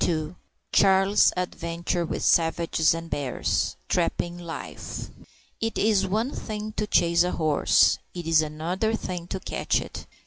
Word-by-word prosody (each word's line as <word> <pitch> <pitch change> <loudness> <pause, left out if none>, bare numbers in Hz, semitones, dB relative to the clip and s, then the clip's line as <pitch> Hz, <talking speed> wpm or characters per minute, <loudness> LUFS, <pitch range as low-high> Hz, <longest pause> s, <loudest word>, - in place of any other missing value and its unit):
Charlie's 195 +1 +5
adventures 170 -1 -2
with - - -3
savages 165 -1 +3
and 165 0 -6
bears 140 -5 -1
Trapping 175 0 -1
life. 170 -2 -7 0.5
It 225 0 -2
is 205 -2 +2
one 220 +7 0
thing 215 -4 -5
to 210 - -1
chase 170 -3 +3
a 180 +1 +1
horse; 155 -3 +3 0.2
it 175 -2 -5
is 165 -1 +4
another 170 +8 -1
thing 180 -5 -5
to 190 - -4
catch - - -1
it. - - -8
175 Hz, 135 wpm, -25 LUFS, 165-200 Hz, 0.5 s, Charlie's